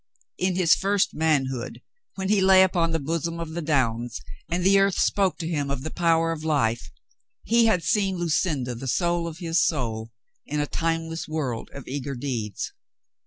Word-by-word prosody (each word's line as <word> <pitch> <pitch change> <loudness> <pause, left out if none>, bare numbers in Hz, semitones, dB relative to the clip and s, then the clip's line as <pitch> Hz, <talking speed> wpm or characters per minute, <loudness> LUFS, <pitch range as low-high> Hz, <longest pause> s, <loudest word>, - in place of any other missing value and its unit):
In 185 0 +1
his 180 -3 +5
first 200 0 +1
manhood, 135 -6 0 0.4
when 190 -1 -3
he 205 -2 +3
lay 190 0 +7
upon 175 -3 +1
the 165 - 0
bosom 165 +3 -2
of 165 -1 -5
the 170 +2 -4
downs 120 - 0 0.3
and 175 +1 -1
the 195 +1 +5
earth 195 -1 +2
spoke 195 -3 +2
to 165 - -4
him 145 -4 -1
of 140 -1 -3
the 155 - -4
power 165 -1 +2
of 160 -1 -5
life, 120 - 0 0.5
he 230 0 +4
had 180 -6 +2
seen 195 -3 +1
Lucinda 155 -6 0
the 125 +3 -7
soul 170 +4 0
of 160 -1 -7
his 170 +1 +1
soul 115 -9 -1 0.4
in 150 +1 -2
a 145 - +1
timeless 165 +1 -2
world 140 -7 -3
of 140 - -10
eager 140 0 -4
deeds. 120 -6 -4
165 Hz, 180 wpm, -25 LUFS, 135-175 Hz, 0.5 s, lay